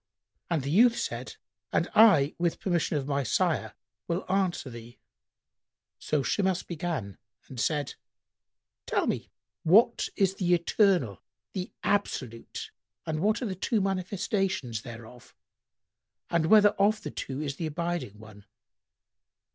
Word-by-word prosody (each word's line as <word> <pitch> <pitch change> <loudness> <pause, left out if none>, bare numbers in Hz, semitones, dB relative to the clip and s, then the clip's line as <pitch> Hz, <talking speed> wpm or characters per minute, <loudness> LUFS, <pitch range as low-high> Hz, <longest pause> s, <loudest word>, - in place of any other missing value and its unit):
And 165 -5 0
the 140 - -2
youth 235 +7 +5
said, - - -4 0.4
"And - - +1
I, 160 -10 +6
with 170 -1 0
permission 170 -4 0
of 135 - -2
my 140 -1 0
sire, 125 - 0 0.3
will 170 +2 -2
answer 190 -6 0
thee." 115 0 -11 1.0
So 150 -3 0
Shimas 190 +3 0
began 155 - -4 0.3
and 130 - -8
said, 145 +1 0 0.9
"Tell - - +1
me - - -2 0.3
what 195 +9 +4
is 195 -2 +2
the 180 -2 +2
Eternal, 170 - +2 0.3
the 185 -1 -4
Absolute, 130 - -2 0.3
and 155 -1 -2
what 215 +8 +1
are - - -1
the 200 - -2
two 215 +5 0
manifestations[FN#100] 190 - -1
thereof 115 +1 -12 1.0
and 170 -2 +2
whether 210 +2 +7
of 210 +1 +1
the 150 - -5
two 135 0 -5
is 140 -2 -3
the 165 - -2
abiding 165 - -3
one?" 105 -2 -14
170 Hz, 130 wpm, -28 LUFS, 135-195 Hz, 1.0 s, whether